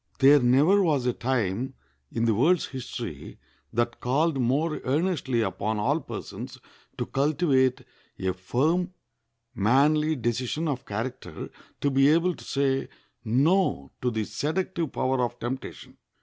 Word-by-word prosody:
There 140 +2 +7
never 140 +11 +4
was 150 -8 +1
a 125 - +2
time 120 -2 -1 0.4
in 115 - 0
the 115 - +3
world's 155 - +3
history 120 - -7 0.3
that 120 +1 -1
called 140 +4 +1
more 145 +6 0
earnestly 140 -4 0
upon 105 +2 -1
all 135 +9 +1
persons - - -7 0.4
to - - -2
cultivate 135 -3 +2 0.4
a 95 0 -1
firm, 155 - 0 0.6
manly 150 +8 +3
decision 125 +6 -1
of 135 -4 -3
character, 110 -5 -5 0.3
to 140 - +1
be 135 +1 +4
able 170 +3 +3
to - - -13
say 135 -1 0 0.3
No 130 - +2
to 125 - +1
the 110 -2 -1
seductive 160 - -2
power 130 -1 0
of 120 0 -3
temptation. 125 +3 -6
130 Hz, 135 wpm, -26 LUFS, 120-155 Hz, 0.6 s, There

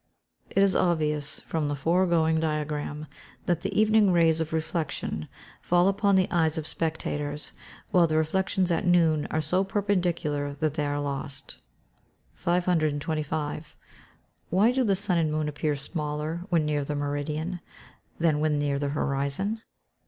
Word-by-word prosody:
] - - -40
It 195 - +5
is 195 -1 +3
obvious 150 -4 0
from 160 -2 -2
the 145 - -1
foregoing 165 +1 +2
diagram 150 -1 -2 0.4
that 175 -2 0
the - - -1
evening 215 -2 +5
rays 165 -2 +3
of 160 - -3
reflection 160 - -2 0.3
fall 175 +1 +3
upon 200 0 +3
the 185 -1 +3
eyes 165 -2 +2
of 160 - -3
spectators, 150 -2 -3 0.4
while 180 -4 +5
the 155 0 0
reflections 185 +3 +1
at 165 - +1
noon 165 -4 +3
are 155 - 0
so 180 +5 +1
perpendicular 175 -8 -1
that 155 0 -1
they 150 -2 -1
are 145 0 -1
lost. 140 -1 -5 0.8
525. 155 -3 -1 0.8
_Why 205 +7 +4
do 260 0 +2
the 200 -4 +2
sun 185 -2 +2
and 155 -2 +1
moon 155 0 -1
appear 150 0 -1
smaller 150 +3 -4
when 165 -4 +2
near 150 -1 0
the 145 +1 -3
meridian, 150 +5 -3 0.6
than 160 -3 +2
when 150 -1 +1
near 145 -1 0
the 145 0 -1
horizon? 145 +9 -1
160 Hz, 150 wpm, -27 LUFS, 150-175 Hz, 0.8 s, It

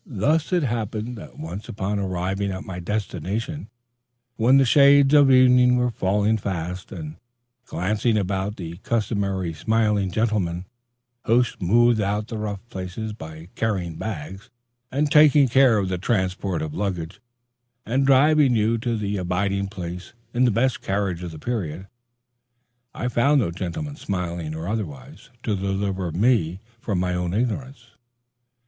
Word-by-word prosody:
Thus 150 - 0
it 175 -3 +2
happened 115 -1 -3
that - - -12
once 85 +7 -7
upon 100 0 -2
arriving 95 +1 -2
at 95 - -5
my 90 -1 -6
destination 105 - -4 0.7
when 125 +4 +4
the 135 - +5
shades 140 +2 +6
of 145 -2 +7
evening 125 -1 +6
were 125 0 +1
falling 105 +2 +1
fast, 90 -1 -4
and 80 -2 -7 0.5
glancing 110 +5 0
about 95 0 -1
for 95 - -8
the 85 +1 -7
customary 100 -5 -1
smiling 105 +2 +1
gentlemen 95 -4 -1 0.6
who 120 +3 +4
smooth 120 +2 +2
out 105 +2 -1
the 110 - -4
rough 105 0 -5
places 95 +3 -5
by 80 -3 -10
carrying 95 -7 -2
bags, 95 +2 -6 0.4
superintending 150 -1 +5 0.4
the 90 -1 -2
transportation 95 -4 -1
of 75 - -7
luggage, 95 0 -4 0.6
and 135 +3 +1
driving 140 -1 +5
you 110 +1 +2
to 115 +1 -1
your 100 -2 -2
abiding 100 +2 -1
place 90 -1 -7 0.2
in 125 +2 +3
the - - +4
best 115 +3 +1
carriage 95 -3 -1
of 90 - -5
the 80 - -9
period, 95 -4 -4 1.1
I 120 - -2
found 140 +5 +3
no 100 -9 0
gentlemen, 100 - -5
smiling 85 - -4
or 80 +2 -5
otherwise, 130 +7 -6
to 110 - 0
deliver 95 -2 -2
me 95 -2 +1 0.2
from 100 -5 -2
my 90 0 0
own 90 0 -2
ignorance. 125 +1 -3
105 Hz, 140 wpm, -23 LUFS, 90-120 Hz, 1.1 s, of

